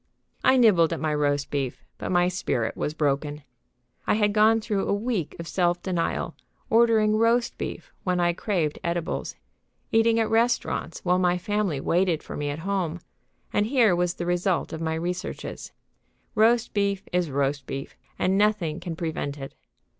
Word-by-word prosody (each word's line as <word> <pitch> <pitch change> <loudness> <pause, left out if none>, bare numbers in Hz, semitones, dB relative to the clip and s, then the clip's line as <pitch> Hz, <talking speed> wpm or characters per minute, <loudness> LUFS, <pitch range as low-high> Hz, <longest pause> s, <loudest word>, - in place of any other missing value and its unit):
I 260 - +5
nibbled 185 -10 +5
at 165 - -3
my 155 -1 0
roast 145 -1 0
beef, 135 -3 -3 0.2
but - - -4
my 175 0 +4
spirit 125 -11 -1
was 150 - -3
broken. 145 0 -1 0.6
I - - +3
had 210 -1 +2
gone 220 +1 +5
through 210 -2 -1
a - - +1
week 205 - -2
of 170 -1 -7
self 175 -1 +1
denial, 180 -3 -1 0.4
ordering 220 -2 +4
roast 230 +2 +2
beef - - -5
when 180 -1 0
I 175 0 +2
craved 170 -5 -1
edibles, 170 -1 -2 0.6
eating 225 0 +4
at 225 - +2
restaurants 230 -1 0
while 180 0 +3
my 180 -1 +2
family 205 -5 -1
waited 175 +2 +1
for - - -7
me 145 0 -2
at 145 - -3
home, 180 -4 -1 0.5
and 205 +1 +2
here 230 -7 +4
was 175 0 0
the 175 - -4
result 175 0 0
of 160 - -5
my 160 0 -1
researches: 180 +3 -5 0.6
Roast 230 +2 +3
beef 200 -1 0
is 180 -3 +1
roast 140 0 -1
beef, 135 0 -6 0.2
and 190 +2 +2
nothing 205 -7 +1
can 175 -2 -5
prevent 160 -4 -3
it. 135 -1 -8
180 Hz, 170 wpm, -25 LUFS, 160-210 Hz, 0.6 s, I